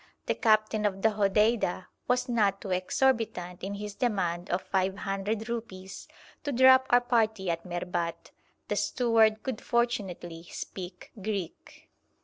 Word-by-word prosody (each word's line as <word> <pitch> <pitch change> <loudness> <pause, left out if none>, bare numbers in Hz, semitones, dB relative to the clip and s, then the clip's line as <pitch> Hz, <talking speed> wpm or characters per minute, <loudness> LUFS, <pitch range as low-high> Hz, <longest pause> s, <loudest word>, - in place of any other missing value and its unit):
The - - +1
captain 215 -1 +2
of 195 -1 -5
the 220 - +6
Hodeida 210 -2 +2 0.2
was 250 +1 +1
not 205 -5 +2
too 195 - -6
exorbitant 185 -2 0
in 200 +1 -3
his 210 0 -6
demand 185 -7 -1
of 180 +1 -1
500 195 +3 -1
rupees 195 -5 -6 0.4
to 290 - -2
drop 260 +1 +6
our 245 0 +6
party 220 -6 +1
at 165 0 -4
Merbat. 175 -1 -3 0.4
The - - -1
steward 225 -3 +3
could 260 -5 -4
fortunately 190 -8 -2
speak 180 -1 -8
Greek. 195 -4 -5
205 Hz, 130 wpm, -29 LUFS, 185-230 Hz, 0.4 s, the